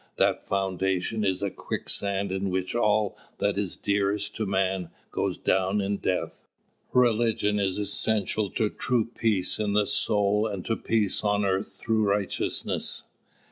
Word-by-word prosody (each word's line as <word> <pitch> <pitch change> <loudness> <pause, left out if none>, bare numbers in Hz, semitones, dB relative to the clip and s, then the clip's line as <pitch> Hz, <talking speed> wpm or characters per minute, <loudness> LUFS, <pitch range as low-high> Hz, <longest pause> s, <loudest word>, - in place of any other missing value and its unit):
That - - +1
foundation 95 +2 0
is 95 -1 0
a 100 - 0
quicksand 100 -1 -1
in 95 +1 -1
which 95 0 -1
all 105 -3 +2 0.2
that 100 0 +1
is 100 -3 -1
dearest 100 0 0
to 110 - -1
man 95 -2 0 0.2
goes - - -1
down 95 +2 +1
in 100 0 0
death. 90 -1 -2 0.5
Religion 115 -4 +3
is 95 -2 0
essential 105 0 0
to 110 -3 +1
true 120 -3 +1
peace 110 -5 0
in 105 -1 0
the 105 0 +4
soul 105 +1 +2
and 100 -4 -5
to 115 - +1
peace 110 -3 0
on 105 -1 +2
earth 95 0 -1
through 110 -1 +1
righteousness. 100 -1 -1
100 Hz, 145 wpm, -27 LUFS, 95-105 Hz, 0.5 s, the